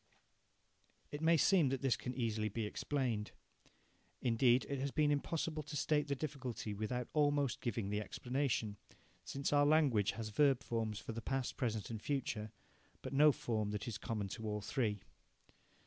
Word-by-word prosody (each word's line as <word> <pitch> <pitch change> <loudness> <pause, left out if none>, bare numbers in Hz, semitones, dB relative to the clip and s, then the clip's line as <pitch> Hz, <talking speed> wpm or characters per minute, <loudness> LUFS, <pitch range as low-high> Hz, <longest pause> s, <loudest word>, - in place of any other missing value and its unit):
It 145 - -5
may 165 +1 +5
seem 170 -3 +4
that 135 0 -2
this 135 -3 +3
can 125 0 -5
easily 110 -3 0
be 110 +2 -2
explained. 115 -2 -1 0.9
Indeed 120 +1 +3
it 140 -1 -2
has 140 +1 -1
been 150 +1 +2
impossible 155 +2 -1
to 150 0 -5
state 150 +1 +1
the 140 - 0
difficulty 130 -6 -4
without 115 +4 -2
almost 145 -4 +2
giving 110 -4 -2
the 105 0 0
explanation, 125 -3 -1 0.5
since 140 +1 -2
our 145 0 +5
language 145 -9 +4
has 115 -2 -5
verb 135 +3 +3
forms 110 -2 -2
for 115 - -6
the 115 +1 -5
past, 135 +1 -2
present, 115 -4 -2
and 110 -2 -5
future, 110 -7 -2 0.5
but - - -5
no 150 +2 +7
form 110 -5 -2
that 105 +2 -4
is 110 -3 -4
common 105 -3 -2
to 110 +2 -5
all 105 0 -2
three. 105 -4 -1
125 Hz, 165 wpm, -36 LUFS, 110-145 Hz, 0.9 s, no